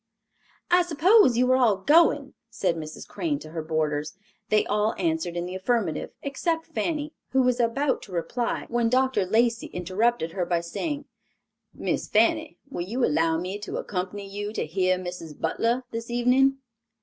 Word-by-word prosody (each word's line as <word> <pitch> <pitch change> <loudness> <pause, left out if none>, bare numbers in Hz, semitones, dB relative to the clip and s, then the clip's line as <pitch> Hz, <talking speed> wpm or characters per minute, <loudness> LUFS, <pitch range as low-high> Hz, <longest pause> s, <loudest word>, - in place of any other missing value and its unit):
"I 355 +1 +6
suppose 345 - +4
you 250 +1 +3
are 255 - +5
all 230 -6 +4
going," 290 - +4 0.2
said 200 -7 0
Mrs. 155 -1 -7
Crane 310 -4 -2
to 155 - -11
her 165 -1 -3
boarders. 155 -1 -1 0.3
They 215 - +3
all 210 +2 +1
answered 170 0 -1
in 175 - -2
the 180 - -6
affirmative 190 -4 -1
except 325 +4 -1
Fanny, 310 -1 -3 0.2
who 265 0 +4
was 250 -1 +2
about 260 +4 +1
to 200 - -12
reply, 230 +8 -2
when 235 -1 +1
Dr. 260 -5 +2
Lacey 230 +3 +2
interrupted 185 +1 0
her 185 +1 -2
by 170 -1 0
saying, 285 - -4 0.7
"Miss - - -2
Fanny, - - +2
will 275 - -5
you 235 +8 0
allow 160 +2 +2
me 185 +4 -4
to 210 - -5
accompany 195 +1 -4
you 205 +1 -5
to - - -2
hear 185 +3 +1
Mrs. 175 -4 -7
Butler 230 +9 0
this 230 +1 -5
evening?" 250 +3 +3
220 Hz, 165 wpm, -26 LUFS, 180-260 Hz, 0.7 s, I